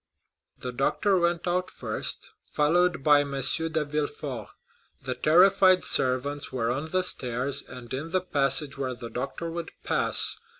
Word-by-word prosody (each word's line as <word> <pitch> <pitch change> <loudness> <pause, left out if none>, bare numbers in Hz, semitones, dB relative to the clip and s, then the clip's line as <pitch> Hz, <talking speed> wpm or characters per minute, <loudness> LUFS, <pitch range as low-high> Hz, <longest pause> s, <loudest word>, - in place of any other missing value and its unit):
The 125 - -6
doctor 180 +9 +1
went 170 0 -1
out 180 +1 -1
first, - - -3 0.2
followed 175 +1 +1
by 145 0 +5
M. 140 -1 -4
de 160 +3 +2
Villefort. 145 -5 -4 0.6
The 130 -1 -3
terrified 185 +7 +4
servants 130 +3 +1
were 120 -2 -1
on 145 +6 -4
the 185 +2 0
stairs 130 -3 -1
and 125 -1 -11
in 145 +5 -4
the 185 +1 0
passage 140 -4 +2
where 130 -2 -3
the 120 -2 -9
doctor 140 +7 -5
would 170 0 -6
pass. - - +2
145 Hz, 145 wpm, -26 LUFS, 130-170 Hz, 0.6 s, by